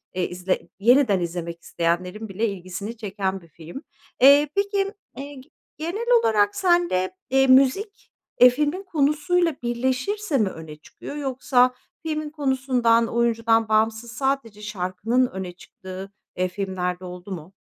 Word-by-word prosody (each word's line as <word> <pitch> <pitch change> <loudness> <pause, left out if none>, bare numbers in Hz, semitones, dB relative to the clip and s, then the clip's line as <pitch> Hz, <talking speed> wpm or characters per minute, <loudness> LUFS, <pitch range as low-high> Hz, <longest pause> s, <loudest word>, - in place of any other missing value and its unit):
eee, 185 -1 0
izle 180 +1 -2
yeniden 235 -2 +4
izlemek 170 -1 -5
isteyenlerin 180 +6 -2
bile 210 +4 -1
ilgisini 195 +3 -6
çeken 195 -3 -3
bir 170 - -18
film. 165 - -10 0.4
Eee, 285 +2 +7
peki, 400 0 0 0.2
eee, 285 +1 -7
g 260 0 -14 0.3
genel 350 +9 -3 0.2
olarak 205 -2 +2
sen 350 -2 +3
de, 185 0 0 0.2
eee, 270 +1 +3
müzik, 275 - +3 0.3
eee, 250 - +10
filmin 300 +8 -1
konusuyla 310 0 +1
birleşirse 260 - -1
mi 210 -5 +2
öne 160 -3 -10
çıkıyor, 155 - -11
yoksa 255 -3 +2 0.3
filmin 310 -1 -3
konusundan, 260 -5 +1
oyuncudan 230 -1 +1
bağımsız 220 +1 +1
sadece 265 -5 -2
şarkının 210 +5 -1
öne 190 -4 -6
çıktığı, 185 +2 -10 0.3
eee, 185 - +1
filmler 180 -1 -3
de 185 - -10
oldu 180 +2 -9
mu? 175 +1 -7
230 Hz, 140 wpm, -23 LUFS, 185-280 Hz, 0.4 s, eee